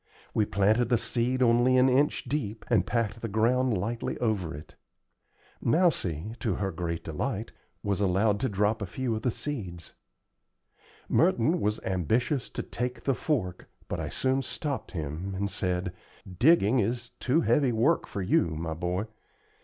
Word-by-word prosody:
We 110 - +2
planted 105 +5 +3
the 120 - +4
seed 125 +3 0
only 120 +2 +4
an 130 +1 +6
inch 135 +3 +2
deep, 115 -7 -3
and - - +3
packed 115 -1 -1
the 115 - -2
ground 115 +2 +2
lightly 115 +5 -3
over 105 -8 -1
it. 75 - -11 0.9
Mousie, 110 - +1
to 110 -7 0
her 100 -2 -2
great 85 0 -3
delight, - - -3 0.3
was 100 0 0
allowed 100 +2 +2
to 130 - 0
drop 105 +2 +1
a 100 - -2
few 120 +4 -2
of 110 - -3
the 125 - +1
seeds. 100 - -5 1.1
Merton 165 -1 +3
was 105 +1 0
ambitious 110 - 0
to - - -4
take 125 +1 -4
the 135 - +2
fork, 115 - -2 0.2
but - - -3
I - - -3
soon 130 +1 0
stopped 140 0 -4
him, 85 +4 -4
and 100 +1 -2
said: 90 -1 -1 0.3
"Digging 120 - +4
is 120 +2 -1
too 140 +6 +2
heavy 145 -5 +3
work 120 +9 +2
for 100 - -4
you, 85 -3 +2
my 80 +1 -3
boy. 90 +5 -2
110 Hz, 160 wpm, -28 LUFS, 95-125 Hz, 1.1 s, an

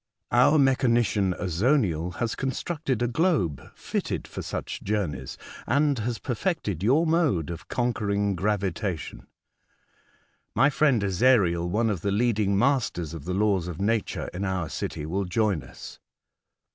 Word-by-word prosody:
Our 135 +6 +5
mechanician, 120 -8 +2
Azoniel, 90 - +1
has 115 +5 -1
constructed 135 -1 -2
a - - +2
globe 120 - +1
fitted - - -3
for - - -6
such - - -5
journeys* 85 -11 -3 0.3
and 145 -2 +2
has 115 +1 -2
perfected 125 - -2
your 135 - +3
mode 155 - +1
of 85 0 -8
conquering 105 -5 0
gravitation. 95 - -2 1.3
My 135 +3 +4
friend 135 -7 +2
Ezariel, 95 -4 +3
one 110 +4 +1
of 95 -6 -3
the 100 - -1
leading 105 -2 +1
masters 115 - +1
of 80 -3 -8
the 90 - -2
laws 100 -4 +1
of 85 -3 -6
nature 105 +1 -1
in 90 +3 -4
our 95 -5 -2
city, 75 - -4
will 95 +5 -2
join 100 -2 +1
us." - - -11
105 Hz, 135 wpm, -26 LUFS, 90-125 Hz, 1.3 s, Our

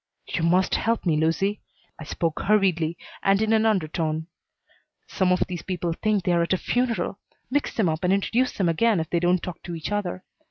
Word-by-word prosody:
"You - - -3
must 180 +3 +2
help 230 -2 0
me, 165 -3 +2
Lucy." 165 +7 0 0.4
I 155 - -7
spoke 165 +1 -2
hurriedly 180 -6 +2 0.2
and 195 0 +3
in 220 +1 +2
an 220 0 +3
undertone. 160 -5 0 0.8
"Some 185 -2 0
of 180 - +2
these 175 -2 -5
people 175 -2 -2
think 210 +2 0
they're 175 -1 +2
at 170 - +1
a - - +2
funeral. 245 +3 -1 0.3
Mix 290 +2 0
them 215 -5 +2
up 160 +2 -1
and 180 - +2
introduce 230 +6 +1
them 190 - 0
again 205 +4 +2
if 160 0 -4
they 170 - +2
don't 175 +1 +2
talk 180 -3 -6
to 170 - -6
each 160 +4 -5
other. 185 -3 -2
180 Hz, 200 wpm, -25 LUFS, 165-210 Hz, 0.8 s, and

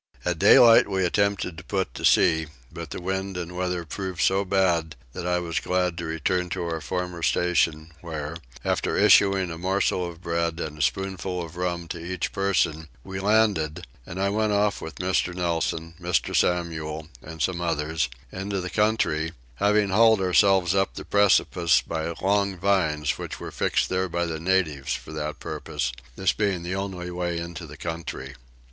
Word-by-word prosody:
At 90 -2 0
daylight 115 +3 +7
we 95 -2 +1
attempted 95 -2 0
to - - -11
put 95 -2 -2
to - - -8
sea; 80 -1 +4 0.2
but - - -7
the - - -5
wind 95 +1 -3
and 90 0 -5
weather 90 -1 -2
proved 95 +1 -5
so 95 +1 +3
bad 90 -4 +1 0.2
that 90 - -5
I 90 0 +2
was 85 -2 -2
glad 90 -1 0
to 85 - -4
return 90 +3 -1
to 90 0 -3
our 80 -1 -3
former 90 -1 -4
station 80 -2 +1
where, 80 -2 -5 0.3
after - - 0
issuing 95 -3 +5
a 80 - -7
morsel 95 -1 0
of 85 -1 -11
bread 85 -1 -1
and 75 -3 -4
a 75 - -6
spoonful 95 +1 -1
of 85 0 -10
rum 85 -1 -2
to 85 -1 -5
each 90 +2 -3
person, 95 -5 0 0.2
we 95 0 -6
landed, 100 -7 +2 0.2
and 85 +9 -7
I 100 +1 +2
went 105 +1 +1
off 105 0 +1
with 80 - -7
Mr. 90 -1 0
Nelson, 85 -2 -1
Mr. 85 0 0
Samuel, 80 -3 0
and 80 0 -10
some 85 +2 0
others, 80 -4 -1 0.2
into 95 +1 -3
the 90 0 -5
country, 105 -7 +1 0.2
having 105 +4 +3
hauled 110 +2 +5
ourselves 95 0 +4
up 95 0 +1
the - - -7
precipice 95 -4 +3
by 80 +1 -3
long 100 -1 +2
vines 85 -6 +1
which - - -6
were - - -7
fixed - - +1
there 95 0 0
by 85 +1 -1
the 80 -2 -4
natives 80 -7 0
for - - -9
that 75 -1 -4
purpose, 70 -4 -3 0.2
this 95 +4 +1
being 100 -5 -1
the 90 +2 -3
only 95 -2 -4
way 90 -1 -2
into 85 0 -6
the 75 0 -11
country. 80 -4 -5
90 Hz, 180 wpm, -25 LUFS, 80-95 Hz, 0.3 s, daylight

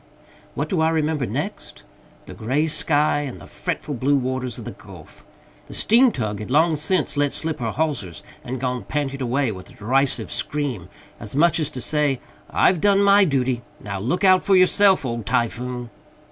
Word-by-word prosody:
What - - -2
do 180 -5 0
I 160 - +3
remember 155 -4 0
next? - - -5 0.4
The - - -10
gray 130 +8 0
sky 150 -1 +2
and 140 -4 -5
the - - -12
fretful 150 - -4
blue 135 +3 +1
waters 130 -2 -2
of - - -8
the - - -5
Gulf. - - -14 0.4
The - - -9
steam 240 +3 +4
tug 110 - -3
had 105 - -7
long 160 +4 +3
since 155 +1 -1
let 145 -1 +2
slip 160 -1 -3
her 115 -2 -2
hawsers 130 - -3 0.2
and 130 +1 -5
gone 125 -1 -2
panting 140 -2 -3
away 130 0 0
with 95 -2 -10
a - - -15
derisive 135 +5 0
scream, 140 - -3 0.3
as 105 - -3
much 165 +2 +3
as 155 -2 0
to 130 - -6
say, 145 -1 +1 0.3
"I've 180 -4 +3
done 200 -1 +4
my 200 0 +6
duty, 130 -5 0 0.2
now 100 -2 -5
look 145 - -1
out 185 -1 +6
for 195 - +3
yourself, 190 -2 +5
old 115 -2 -4
Typhoon!" 120 0 -2
140 Hz, 185 wpm, -22 LUFS, 125-160 Hz, 0.4 s, my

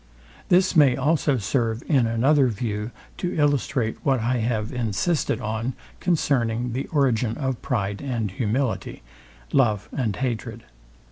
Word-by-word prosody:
This 185 +1 +4
may 140 -6 +6
also 145 0 +2
serve 115 +1 -1
in 135 -7 +3
another 130 +5 +3
view 105 -1 -3 0.3
to 180 -1 -3
illustrate 140 -5 +1
what 135 -3 +2
I 120 +3 0
have 110 0 -1
insisted 125 - 0
on 115 +2 -3 0.2
concerning 125 -8 0
the 130 +3 -3
origin 125 -7 +1
of 130 -4 -2
pride 100 -5 -2
and 120 -7 -2
humility, 115 - -2 0.5
love 110 -7 +2
and 115 -8 -1
hatred. 115 -3 -3
125 Hz, 130 wpm, -24 LUFS, 110-140 Hz, 0.5 s, may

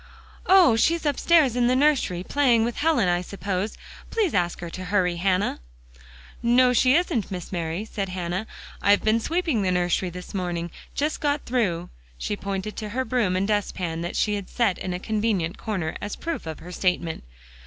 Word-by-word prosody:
"Oh! 365 -10 +7
she's 325 +8 +2
upstairs 290 -2 +3
in 245 -1 +3
the 250 - +3
nursery, 260 -11 +2
playing 245 -3 +3
with 235 - -3
Helen, 295 - +2
I 175 0 +2
suppose. 195 +2 -3 0.3
Please 425 -7 0
ask 175 -2 0
her 170 - -5
to 185 +2 -6
hurry, 180 -2 +1
Hannah." 185 - +1 0.8
"No, 250 +1 +4
she 255 +2 +4
isn't, 325 - +1
Miss 180 -3 -6
Mary," 170 +2 -3
said 200 -3 -4
Hannah. 180 +3 -3 0.3
"I've 200 0 +4
been 220 +1 +3
sweeping 320 - 0
the 190 - +1
nursery 180 +1 +1
this 180 +1 -9
morning; 175 -3 -3 0.2
just 300 +2 -1
got 290 0 0
through." 185 -9 -1 0.3
She 205 - -2
pointed 200 +1 -4
to 215 - -4
her 260 +5 -2
broom 230 -9 +1
and 190 +2 +1
dustpan 185 -5 -1
that 175 - -4
she 210 - +1
had 200 -2 -4
set 225 -7 +1
in 180 -1 -3
a - - -4
convenient 210 -5 -1
corner, 185 -7 -3
as 205 - -4
proof 330 - -4
of 160 - -6
her 180 - -9
statement. 180 -3 -1
205 Hz, 185 wpm, -25 LUFS, 180-250 Hz, 0.8 s, Oh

